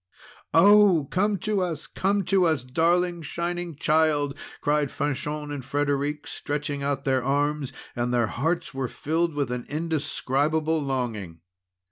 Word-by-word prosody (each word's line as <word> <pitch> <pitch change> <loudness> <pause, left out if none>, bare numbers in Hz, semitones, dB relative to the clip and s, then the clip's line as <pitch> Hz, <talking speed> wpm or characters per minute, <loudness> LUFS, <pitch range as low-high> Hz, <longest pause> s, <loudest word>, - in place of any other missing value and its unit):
"Oh! 190 -4 +6
come 205 +3 +1
to 215 -3 0
us! 165 -4 -3
Come 200 +1 0
to 190 -1 +3
us! 155 -6 +1
darling 170 +6 +1
Shining 175 +1 -3
Child!" 150 -2 +2 0.2
cried 145 -1 +1
Fanchon 150 +1 -3
and 145 -3 -5
Frederic, 145 +2 -1
stretching 145 -1 -3
out 140 -1 -1
their 130 -2 +1
arms; 145 +1 0 0.2
and 120 0 -1
their 120 -2 +2
hearts 160 +11 -2
were 135 -1 -2
filled 160 +5 -1
with 140 -4 -1
an 125 -1 -3
indescribable 155 0 0
longing. 115 - -3
150 Hz, 135 wpm, -25 LUFS, 135-165 Hz, 0.2 s, Oh